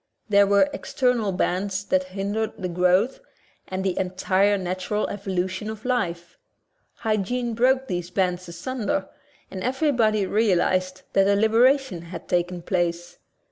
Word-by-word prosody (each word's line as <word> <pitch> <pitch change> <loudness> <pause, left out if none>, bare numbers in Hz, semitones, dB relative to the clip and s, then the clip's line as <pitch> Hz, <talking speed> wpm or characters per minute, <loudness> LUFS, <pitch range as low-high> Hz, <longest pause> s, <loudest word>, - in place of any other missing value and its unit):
There 200 -1 +5
were 200 +7 +4
external 245 -6 0
bands 190 +2 -1
that 185 -2 +1
hindered 200 +4 -3
the 185 - -3
growth 180 - +2 0.5
and 185 0 -3
the 190 -2 0
entire 190 +2 +1
natural 185 +3 -2
evolution 190 +1 -3
of 220 +1 -8
life. 175 -9 -2 0.6
Hygiene 225 +3 -1
broke 260 +3 +2
these 175 -1 -3
bands 180 -1 -1
asunder 195 +2 -3 0.4
and 190 - -6
everybody 245 -6 +2
realized 185 -3 +1
that 195 0 +4
a 200 - +4
libera 225 +6 +5
tion 235 -12 -8
had 170 0 -9
taken 175 0 -1
place. 175 -1 -2
195 Hz, 135 wpm, -24 LUFS, 180-220 Hz, 0.6 s, There